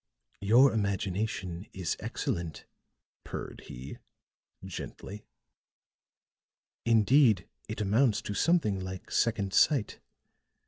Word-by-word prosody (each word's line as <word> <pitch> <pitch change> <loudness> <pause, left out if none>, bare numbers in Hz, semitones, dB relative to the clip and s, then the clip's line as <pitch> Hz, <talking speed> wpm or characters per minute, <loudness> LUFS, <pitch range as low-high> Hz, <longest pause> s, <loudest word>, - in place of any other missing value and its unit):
"Your 120 +7 +5
imagination 100 -2 -2
is 90 -5 -2
excellent," 85 -3 -4 0.6
purred - - -7
he, 65 +3 -8 0.7
gently; 100 +2 -8 1.6
"indeed, 115 - +4 0.2
it 110 0 -4
amounts 110 +3 +2
to 105 - -4
something 110 - +2
like 95 0 -7
second 100 -4 +1
sight. 135 -5 +3
100 Hz, 85 wpm, -30 LUFS, 95-115 Hz, 1.6 s, Your